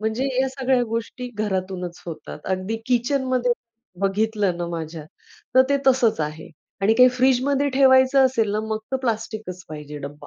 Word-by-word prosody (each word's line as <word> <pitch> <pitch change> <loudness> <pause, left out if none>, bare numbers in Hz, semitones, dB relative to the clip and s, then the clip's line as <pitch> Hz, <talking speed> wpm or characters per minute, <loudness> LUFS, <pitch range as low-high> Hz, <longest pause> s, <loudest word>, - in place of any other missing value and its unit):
म्हणजे 220 +4 -1 0.2
या 265 - +1
सगळ्या 260 -1 +1
गोष्टी 230 +2 -4
घरातूनच 185 -4 -3
होतात. 155 -3 -7
अगदी 190 +4 -2
किचनमध्ये 255 0 +1 0.5
बघितलं 200 -1 0
ना, 175 - -2
माझ्या 160 -2 -6 0.5
तर 260 - +8
ते 280 - +3
तसंच 250 - +3
आहे 155 +1 -4 0.3
आणि 215 +3 +4
काही 250 +2 +7
फ्रिजमध्ये 265 +3 +2
ठेवायचं 265 0 +5
असेल 230 -5 0
ना, 210 - 0
मग 220 0 -3
तर - - +3
प्लास्टिकच 220 -6 -4
पाहिजे 150 -1 -8
डब्बा. 145 +1 -9
220 Hz, 150 wpm, -23 LUFS, 185-255 Hz, 0.5 s, तर